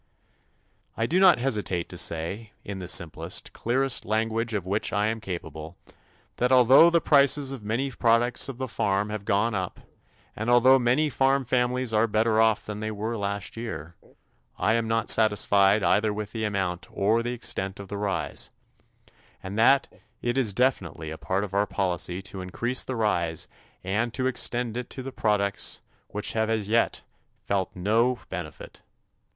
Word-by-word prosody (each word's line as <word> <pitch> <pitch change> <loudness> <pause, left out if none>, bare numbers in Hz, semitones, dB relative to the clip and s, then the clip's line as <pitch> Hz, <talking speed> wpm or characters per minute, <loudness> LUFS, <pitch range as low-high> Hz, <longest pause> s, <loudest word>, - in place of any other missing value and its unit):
I 115 - +1
do 170 +10 +1
not 190 -2 +7
hesitate 105 -9 -1
to - - -8
say, 90 +6 -3
in 100 -1 -5
the 90 - -6
simplest, 85 -2 -2
clearest 130 +2 0
language 115 +1 -1
of 100 -4 -2
which 100 +3 -1
I 105 0 +1
am 110 +1 -1
capable, 80 -3 -7 0.6
that 125 +1 +1
although 130 +6 +7
the 170 0 +3
prices 140 -2 +3
of 135 -4 -6
many 120 +6 -2
products 120 +2 +2
of 130 - -6
the 130 0 -3
farm 105 -2 -1
have 105 -2 -5
gone 105 +4 +1
up 95 -3 -3 0.6
and 110 +2 -3
although 130 +2 +6
many 130 +5 +2
farm 135 +1 +2
families 125 0 0
are 110 +2 +3
better 110 +1 +2
off 110 -1 +2
than 105 0 -6
they 110 0 -3
were 110 +2 -3
last 100 -2 -3
year, 85 -9 -6 0.6
I 110 - +2
am 115 -1 0
not 115 0 0
satisfied 105 -2 +4
either 105 0 +3
with 105 0 -5
the 110 -1 -3
amount 95 -4 -2
or 110 +4 +1
the 120 +1 -2
extent 100 -5 -3
of 100 - -8
the 100 - -5
rise, 100 -2 -3 0.9
and 95 +2 -6
that 135 +4 +5 0.3
it 120 0 -1
is 130 -6 +2
definitely 95 -9 -1
a 80 - -6
part 95 +2 -1
of 100 -2 -6
our 100 +1 +2
policy 90 -1 -2
to 95 -1 -7
increase 120 +8 -2
the 130 - -4
rise 85 -8 0 0.4
and 105 +6 -1
to 130 - -1
extend 120 -2 -1
it 125 - -5
to 130 - -7
those 135 0 -7
products 100 -3 0 0.3
which 105 0 -3
have 110 0 0
as 110 -3 -1
yet 115 +2 +1 0.4
felt 95 -2 -2
no 115 +7 +2
benefit. 85 -5 -8
110 Hz, 170 wpm, -26 LUFS, 100-120 Hz, 0.9 s, not